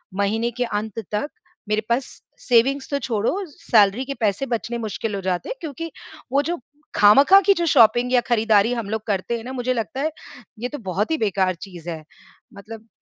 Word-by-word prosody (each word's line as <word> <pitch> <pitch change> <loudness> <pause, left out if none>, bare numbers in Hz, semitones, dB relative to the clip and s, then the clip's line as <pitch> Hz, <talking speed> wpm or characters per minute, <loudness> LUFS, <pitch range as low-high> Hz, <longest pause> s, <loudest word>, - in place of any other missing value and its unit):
महीने 220 +4 0
के 250 +2 -2
अंत 215 -2 -3
तक 210 +8 -1 0.4
मेरे 215 0 +1
पास 240 +3 +1 0.3
सेविंग्स 265 +3 +2
तो 280 - 0
छोड़ो, 225 -5 -1 0.2
सैलरी 220 -4 +2
के 275 - -4
पैसे 215 +3 0
बचने 235 -1 -3
मुश्किल 220 -1 -4
हो 195 - -4
जाते 185 -2 -2
हैं - - -3
क्योंकि 325 +1 -6 0.4
वो 280 +2 +3
जो 345 - -1 0.4
खामखा 275 - +7
की 400 - +6
जो 345 -3 -1
शॉपिंग 240 -4 +4
या 250 - +5
खरीदारी 225 -1 +3
हम 230 -4 -4
लोग 220 0 -2
करते 205 +3 -1
हैं 225 - -9
ना, 250 - -7
मुझे 255 0 -1
लगता 230 +2 -3
है, 310 +2 0 0.5
ये 245 +2 -3
तो 295 - -6
बहुत 200 - -1
ही 320 - +2
बेकार 190 -5 0
चीज़ 175 -4 -9
है। 160 -2 -6 0.5
मतलब 220 +2 -11
225 Hz, 195 wpm, -22 LUFS, 205-255 Hz, 0.5 s, खामखा